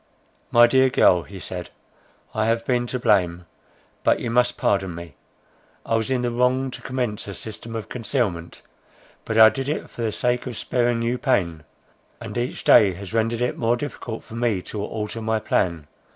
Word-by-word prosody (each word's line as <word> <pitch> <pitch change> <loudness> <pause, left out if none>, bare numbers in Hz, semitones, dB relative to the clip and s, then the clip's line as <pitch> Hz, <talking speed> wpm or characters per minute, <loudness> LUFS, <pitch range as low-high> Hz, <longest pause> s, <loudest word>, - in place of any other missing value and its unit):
"My 120 0 +7
dear 130 +2 +4
girl," 90 -7 +4
he 95 +2 -10
said, 90 -1 -7 0.6
"I 110 0 0
have 115 0 0
been 120 -1 +1
to 125 - -2
blame; 90 -7 +1 0.6
but - - +3
you 115 - -3
must 125 +1 +2
pardon 95 -3 0
me. 85 -3 -9 0.7
I - - -2
was 110 +1 0
in 130 -2 0
the 120 - 0
wrong 125 +2 +1
to - - -8
commence 125 -6 -3
a 100 - -6
system 115 +4 -7
of 110 -3 -4
concealment; 110 -8 -3 0.6
but 110 - -2
I 110 0 +10
did 135 +3 -4
it 155 - -3
for - - -8
the 115 -2 0
sake 125 +3 -1
of 120 - -5
sparing 120 -1 0
you 120 +2 -1
pain; 85 - 0 0.5
and - - -8
each 120 +1 -3
day 100 -3 +6
has 100 +3 -9
rendered 115 +1 0
it 125 - -1
more 120 +1 +2
difficult 120 -4 -6
for - - -14
me 115 -5 0
to 105 -2 -5
alter 105 +1 -4
my 110 0 0
plan. 85 -7 0
115 Hz, 190 wpm, -23 LUFS, 100-125 Hz, 0.7 s, I